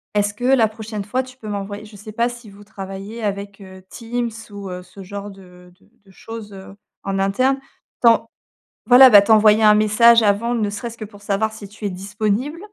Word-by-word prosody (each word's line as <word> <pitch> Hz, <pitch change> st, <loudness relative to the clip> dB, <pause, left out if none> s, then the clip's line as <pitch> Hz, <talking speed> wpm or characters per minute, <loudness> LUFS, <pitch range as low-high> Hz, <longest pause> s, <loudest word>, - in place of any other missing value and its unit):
est-ce 205 Hz, 0 st, +1 dB
que 215 Hz, -, -11 dB
la 255 Hz, -4 st, +4 dB
prochaine 215 Hz, -1 st, -7 dB
fois 250 Hz, +6 st, -1 dB
tu 255 Hz, 0 st, -15 dB
peux 220 Hz, -, -11 dB
m'envoyer» 205 Hz, +1 st, -5 dB
je 210 Hz, 0 st, -15 dB
sais 215 Hz, +2 st, -10 dB
pas 235 Hz, +2 st, 0 dB
si 235 Hz, -3 st, -11 dB
vous 200 Hz, +1 st, -15 dB
travaillez 200 Hz, +2 st, -8 dB
avec, 200 Hz, 0 st, -4 dB
heu, 190 Hz, -1 st, -13 dB
Teams 235 Hz, 0 st, -4 dB, 0.2 s
ou 200 Hz, -1 st, -8 dB
heu, 180 Hz, 0 st, -6 dB
ce 190 Hz, +2 st, -13 dB
genre 200 Hz, +2 st, -7 dB
de 180 Hz, -2 st, -17 dB
de -, -, -27 dB, 0.2 s
de 195 Hz, -, -20 dB
choses, 225 Hz, +1 st, -10 dB
heu, 195 Hz, 0 st, -12 dB, 0.3 s
en 195 Hz, 0 st, -2 dB
interne, 255 Hz, +8 st, +1 dB, 0.4 s
t'en 230 Hz, -2 st, +4 dB, 0.6 s
voilà, 255 Hz, +1 st, +9 dB
bah, 205 Hz, -, +9 dB
t'envoyer 215 Hz, +1 st, +4 dB
un 210 Hz, 0 st, +6 dB
message 230 Hz, +2 st, +5 dB
avant, 210 Hz, +3 st, +1 dB
ne 215 Hz, -3 st, -1 dB
serait-ce 230 Hz, +3 st, -7 dB
que 215 Hz, -, -7 dB
pour 205 Hz, -1 st, -16 dB
savoir 210 Hz, +2 st, -1 dB
si 205 Hz, -2 st, -10 dB
tu 210 Hz, +1 st, -9 dB
es -, -, 0 dB
disponible. 210 Hz, -, -3 dB
210 Hz, 205 wpm, -20 LUFS, 200-230 Hz, 0.6 s, voilà